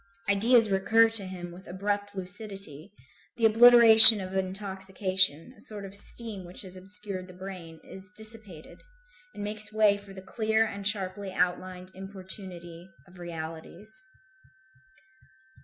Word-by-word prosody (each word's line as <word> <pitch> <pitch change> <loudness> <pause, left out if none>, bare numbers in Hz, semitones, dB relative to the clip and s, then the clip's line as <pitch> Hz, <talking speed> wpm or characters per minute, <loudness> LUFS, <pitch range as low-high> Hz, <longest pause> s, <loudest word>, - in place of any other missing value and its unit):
Ideas 220 +2 0
recur 220 +4 +1
to 205 -4 +8
him 175 -2 -11
with 180 +2 -16
abrupt 205 +2 -6
lucidity; 190 -3 -12 0.5
the 230 - -1
obliteration 225 -1 +9
of 190 0 -9
intoxication, 190 - -5
a - - -21
sort 205 -2 -11
of 195 - -13
steam 210 -1 -11
which 175 +3 -13
has 185 -1 -13
obscured 195 0 -10
the 185 - -17
brain, 180 -4 -12
is 190 0 -15
dissipated, 215 -7 -14 0.5
and 205 - -9
makes 210 +1 -8
way 215 -2 0
for 200 -1 -17
the 190 -1 -14
clear 220 +3 -3
and 200 -2 -8
sharply 195 -1 -6
outlined 180 +1 -5
importunity 185 -2 -13 0.2
of 180 0 -20
realities. 170 +4 -11
195 Hz, 130 wpm, -25 LUFS, 185-210 Hz, 0.5 s, obliteration